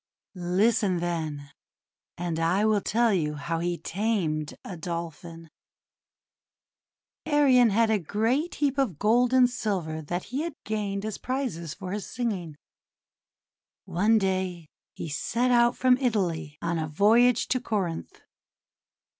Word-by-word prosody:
Listen, 185 +2 +1
then, 155 -5 -3 0.7
and 170 -2 -3
I 180 +6 +2
will 215 -2 +3
tell 230 +1 +2
you 150 -5 0
how 165 +3 -3
he 175 +1 -1
tamed 170 -8 -2
a 190 - -6
Dolphin: 165 -1 -6 0.9
— - - -68
Arion 270 -6 +5
had 220 +2 +3
a 215 - +2
great 225 - 0
heap 280 -2 0
of 225 - 0
gold 240 +6 +3
and 255 -1 +6
silver 190 -10 -3
that 175 +4 -4
he 275 - 0
had 330 -2 -4
gained 205 -2 -2
as 215 -2 -4
prizes 225 - -3
for 185 -2 -7
his 205 0 -4
singing. 190 -11 -3 1.3
One 210 +6 +2
day 185 -5 -1 0.3
he - - -5
set 235 - 0
out 240 0 +4
from 255 0 +4
Italy 180 - -1
on 170 0 -1
a 160 - -2
voyage 225 +9 +4
to 255 - +1
Corinth. 190 -9 -3
195 Hz, 135 wpm, -27 LUFS, 170-235 Hz, 1.3 s, and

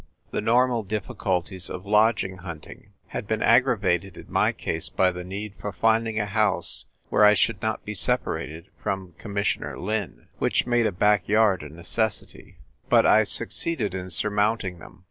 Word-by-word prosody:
The - - -1
normal 120 0 +3
difficulties 95 -3 -2
of 90 +2 -7
lodging 105 -2 +2
hunting 85 -4 -10 0.2
had - - -5
been 110 +1 -1
aggravated 105 -8 +2
in - - -10
my - - +3
case 80 0 -3
by 95 -1 +2
the 90 0 -6
need 100 +3 -6
for 105 - -3
finding 115 0 +1
a 105 - 0
house 100 -3 0 0.2
where 105 - +3
I 105 0 +7
should 105 -3 +1
not 110 0 -2
be 105 - -4
separated 85 -2 -1
from 95 -3 -3
Commissioner 100 -1 -2
Lin; 105 -1 -4
which - - +1
made 120 -2 +2
a - - -1
back 105 +1 +2
yard 105 -3 +3
a 75 - -8
necessity: 100 +7 -3 0.3
but - - +5
I - - +5
succeeded 120 - 0
in 95 -1 -5
surmounting 105 0 0
them. - - -14
105 Hz, 165 wpm, -25 LUFS, 95-110 Hz, 0.3 s, I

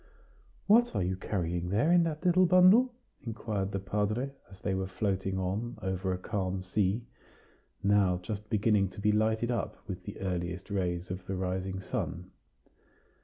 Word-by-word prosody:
"What 235 +4 +5
are - - +1
you 95 +1 0
carrying 90 -2 -2
there 115 - +2
in 175 0 +6
that 160 +2 -4
little 180 +1 +5
bundle?" 185 +8 +6 0.3
inquired 105 -4 -3
the 100 - -1
padre, 105 +7 -1 0.2
as 95 -1 -14
they 100 - -1
were 95 0 -1
floating 95 0 -1
on 100 +6 -2
over 95 -2 -2
a 90 - -1
calm 95 -1 -2
sea, 100 +4 0 0.8
now 100 -3 +4
just 105 +2 -5
beginning 105 -2 +2
to - - -6
be 105 +1 +3
lighted 110 +2 +1
up 120 - -2
with 90 -3 -6
the - - -7
earliest 90 +1 -3
rays 90 -2 -1
of 95 0 -6
the 95 - -2
rising 95 +1 -2
sun. 90 0 -4
100 Hz, 165 wpm, -30 LUFS, 95-110 Hz, 0.8 s, in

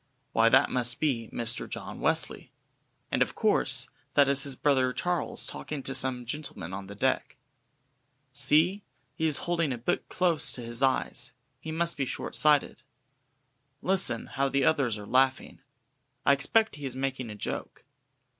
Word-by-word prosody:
Why 115 0 +4
that 130 +3 +4
must 125 -1 +1
be 125 -7 -1
Mr. 120 0 -2
John - - -7
Wesley! - - 0 0.6
And, - - 0
of - - +1
course, - - +2 0.3
that 140 -1 +5
is 140 0 +3
his 140 -1 -1
brother 130 -2 +1
Charles 180 +4 -2
talking 150 -3 -6
to 135 - -3
some 130 -2 -1
gentlemen 120 - -6
on 95 0 -6
the 100 - -9
deck. - - -1 1.0
See, 155 +8 +4 0.3
he 160 - -1
is 150 - +4
holding 170 -4 0
a 125 - -3
book 125 +10 -2
close 175 -4 +1
to 125 - -6
his 120 +1 -1
eyes 130 -2 0 0.3
he 160 - -7
must 170 +1 0
be 140 - 0
short - - -5
sighted. 150 -2 +3 1.0
Listen, 185 -11 +2
how 135 0 -1
the 140 -1 +1
others 135 -8 +1
are 105 - -9
laughing! 130 +4 +1 0.6
I 140 - +6
expect 215 - +2
he 145 -2 -5
is 130 - -4
making 130 -2 -3
a 105 - -7
joke. 105 - -6
135 Hz, 165 wpm, -28 LUFS, 125-150 Hz, 1.0 s, I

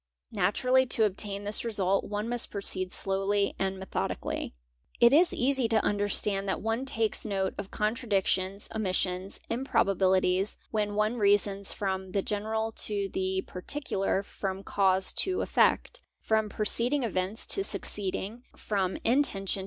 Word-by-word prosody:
Naturally 250 +6 +2
to 230 -2 +3
obtain 200 0 -2
this 205 +1 +4
resu 195 -4 0
one 210 +2 -4
must 240 0 +1
proceed 185 -2 -2
slowly 195 +1 0
and 190 0 -1
methodically. 190 - -4 0.2
| - - -30
It 235 +2 +6
is 340 +4 +5
easy 265 -1 +1
to 225 -1 +2
understand 205 -1 0
that - - -1
one 225 +4 -2
takes 225 -5 -1
note 195 -3 -1
of 200 -1 -5
contradictions, 205 -3 0
omi: 215 -4 -1
sions, 185 +1 -1
improbabilities, 195 -5 +1
when 210 -2 -1
one 215 +3 +1
reasons 200 -1 +2
from 190 -2 -3
the 195 - 0
general 220 +2 -2 0.2
to 200 -2 -2
the 190 0 -1
parti 185 +11 -2
cular, 195 -5 -1
from 195 -1 -5
cause 190 -2 +1
to 375 -1 +2
effect, - - +1 0.2
from 220 -1 0
preceeding 235 +7 +1
events 195 0 -2
to 390 - +1
succeeding, 205 - -1
from 190 -3 -2
intention. 225 -7 +2
205 Hz, 145 wpm, -28 LUFS, 190-225 Hz, 0.2 s, It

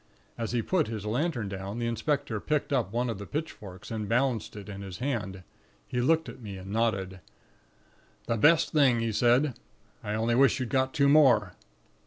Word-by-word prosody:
"As 115 -2 -4
he 120 -2 0
put 180 -5 +1
his 110 -2 -5
lantern 120 0 -1
down, 95 +2 -5
the 120 - -2
inspector 115 0 -1
picked 150 +4 -1
up 120 -8 0
one 120 +2 0
of 115 -4 -4
the 100 - -8
pitchforks, 105 - -6
and 105 -2 -4
balanced 125 -2 0
it 105 -2 -9
in 100 -1 -7
his 95 -3 -7
hand; 105 -9 -3 0.4
he 125 - -1
looked 160 +5 +2
at - - -10
me, 100 -4 -7
and 95 +1 -9
nodded. 95 -4 -1 1.1
"'The 115 - -1
best 150 +8 +4
thing,' 135 -6 +4
he 115 -1 -1
said. 125 +5 +3 0.5
'I 105 0 -2
only 115 +2 0
wish 135 +3 +4
you'd 125 -3 -3
got 130 0 0
two 140 -2 +4
more.' 125 - +5
115 Hz, 190 wpm, -28 LUFS, 105-135 Hz, 1.1 s, more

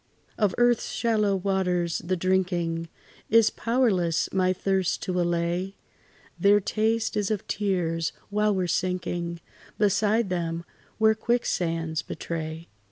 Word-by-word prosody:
Of 210 -4 +1
earth's 240 -1 +2
shallow 215 -4 +1
waters 180 -3 0
the 185 +3 -1
drinking 175 -2 0 0.4
Is 225 -1 +5
powerless 200 -9 +1
my 185 -1 +2
thirst 190 -1 0
to 180 -1 0
allay; 175 +3 -1 0.6
Their 205 +1 +5
taste 220 +2 0
is 205 -2 0
of 215 -3 -2
tears, 175 -5 -1 0.2
while 210 0 +2
we 185 - 0
're - - -1
sinking 175 -1 -2 0.4
Beside 210 +1 +2
them, 170 -1 -2 0.3
where 220 0 +5
quicksands 165 -8 -1
betray. 160 0 -5
185 Hz, 120 wpm, -26 LUFS, 170-210 Hz, 0.6 s, Is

